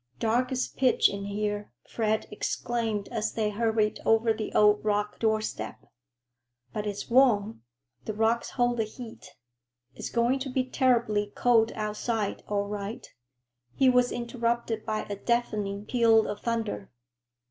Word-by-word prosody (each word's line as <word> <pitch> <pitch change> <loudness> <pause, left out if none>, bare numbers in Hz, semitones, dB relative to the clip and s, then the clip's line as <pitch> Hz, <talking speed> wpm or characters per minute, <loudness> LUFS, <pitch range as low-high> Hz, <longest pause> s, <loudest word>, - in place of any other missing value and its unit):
"Dark 240 - +1
as 255 -1 0
pitch 255 -2 +3
in 200 0 -5
here," 205 0 -3 0.2
Fred 220 -1 0
exclaimed 220 -1 -2
as 220 -2 -2
they 215 -2 0
hurried 220 0 +1
over 225 0 +3
the 215 -1 -5
old 210 0 +5
rock 210 0 -1
doorstep. 215 - -2 0.9
"But 210 0 -3
it's 205 -1 -4
warm. 230 - +3 0.4
The 215 - -4
rocks 225 +2 +1
hold 245 -1 +1
the 225 - +2
heat. 225 +1 -10 0.6
It's - - -6
going 240 +3 +1
to 265 0 -4
be 255 0 0
terribly 240 -5 +1
cold 230 -2 +3
outside, 215 0 -2
all 205 -1 0
right." 205 +2 -5 0.7
He 265 -1 +5
was 250 0 +3
interrupted 235 -2 -2
by 215 0 -1
a 205 - -3
deafening 210 -3 -1
peal 225 -2 +4
of 205 - -5
thunder. 225 - -2
220 Hz, 140 wpm, -28 LUFS, 210-235 Hz, 0.9 s, old